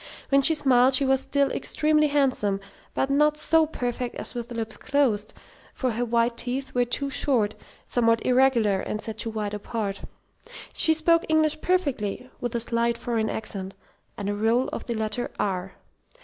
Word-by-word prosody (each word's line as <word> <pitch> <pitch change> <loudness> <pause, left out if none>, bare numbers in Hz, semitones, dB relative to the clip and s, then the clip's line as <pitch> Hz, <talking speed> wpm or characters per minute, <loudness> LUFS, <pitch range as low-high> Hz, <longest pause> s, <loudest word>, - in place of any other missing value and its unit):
When 275 0 +4
she 320 +4 +4
smiled 260 -3 +4
she 275 - +3
was 265 0 +2
still 280 +1 0
extremely 305 0 +2
handsome, 260 -9 +1 0.4
but 270 - 0
not 300 +1 +3
so 320 +1 +3
perfect 245 -4 -4
as - - -2
with 240 0 -6
lips 225 -2 -4
closed, 235 -8 0 0.4
for 255 -2 -1
her 235 +2 -2
white 235 0 +1
teeth 265 +2 -3
were 245 0 +2
too 275 +3 -1
short, 255 -7 +2 0.3
somewhat 230 -2 +1
irregular, 245 -6 +3
and 215 - -4
set 220 0 -7
too 230 - -2
wide 210 -2 -4
apart. 205 -1 -4 0.7
She 320 -1 +3
spoke 335 +1 +3
English 310 -1 +3
perfectly, 260 - -1
with 245 -1 -4
a - - +1
slight 235 0 0
foreign 230 -2 -1
accent 195 -3 -4 0.4
and 200 - -4
a 205 - 0
roll 225 +5 +1
of - - -7
the 235 - -2
letter 220 +2 -2
"r." 190 -2 -2
245 Hz, 170 wpm, -25 LUFS, 220-275 Hz, 0.7 s, When